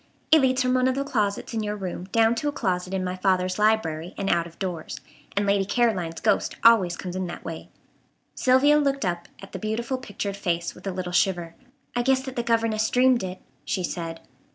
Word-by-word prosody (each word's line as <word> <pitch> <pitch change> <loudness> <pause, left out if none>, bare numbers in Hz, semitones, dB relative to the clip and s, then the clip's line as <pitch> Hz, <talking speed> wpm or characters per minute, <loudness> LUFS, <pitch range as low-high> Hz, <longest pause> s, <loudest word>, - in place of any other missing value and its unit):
It 315 -1 +7
leads 260 0 +2
from 255 0 +1
one 255 0 +3
of 260 - +1
the 275 - 0
closets 210 -6 -1
in 225 - -1
your 210 0 -2
room 185 -3 -5
down 225 +3 +3
to 235 +5 -2
a - - +1
closet 185 -8 -2
in 190 -1 -1
my 180 0 -2
father's 185 0 +1
library 180 -6 +1
and 195 0 0
out 170 0 +1
of 170 - -16
doors, 180 -5 -4 0.4
and 200 - +2
Lady 200 0 +2
Caroline's 195 -6 0
ghost 210 -2 +1
always 200 -7 +5
comes 180 -1 -6
in 185 -1 -2
that 175 - -8
way." 165 0 -7 0.6
Sylvia 275 +4 +4
looked 275 -4 0
up 175 -1 -2 0.2
at 195 - -11
the - - -6
beautiful 230 +4 -2
pictured 205 -4 -4
face 170 -3 -1
with - - -10
a - - 0
little 180 -1 -4
shiver. 175 -2 +1 0.4
"I 240 - +2
guess 260 +1 +2
that 265 -1 -7
the 240 - 0
governess 225 -2 +1
dreamed 250 -1 +4
it," 185 0 -6 0.2
she 185 - -2
said. 165 -2 -4
200 Hz, 215 wpm, -25 LUFS, 180-240 Hz, 0.6 s, It